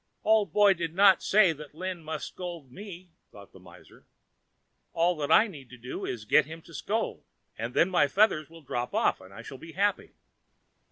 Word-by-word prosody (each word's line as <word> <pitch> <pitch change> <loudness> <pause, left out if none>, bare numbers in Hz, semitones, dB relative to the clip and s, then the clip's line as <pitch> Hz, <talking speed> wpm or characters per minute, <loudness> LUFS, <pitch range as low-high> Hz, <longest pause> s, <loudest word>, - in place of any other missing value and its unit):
"Old 215 -1 +3
Boy 205 -1 +5
did 165 -2 -5
not 195 -1 +6
say 195 -5 +4
that 150 -1 -12
Lin 180 0 -5
must 155 0 -5
scold 170 -7 -8
me," 185 0 -11 0.2
thought 100 -1 -14
the 95 - -14
miser. 85 -2 -18 0.9
"All 175 +2 +2
that 150 0 -3
I 215 - +7
need 145 - -11
do 125 +3 -6
is 120 - -4
to - - -19
get 150 -2 +5
him 160 +1 -10
to - - -16
scold, - - -3 0.3
and 115 +3 -5
then 180 - +3
my 160 -5 +3
feathers 155 -3 +2
will 165 -1 -15
drop 125 -2 -4
off - - +1
and 95 +1 -15
I 95 - -11
shall 135 - -10
be 165 0 -11
happy. 200 +2 -1
165 Hz, 200 wpm, -28 LUFS, 140-190 Hz, 0.9 s, I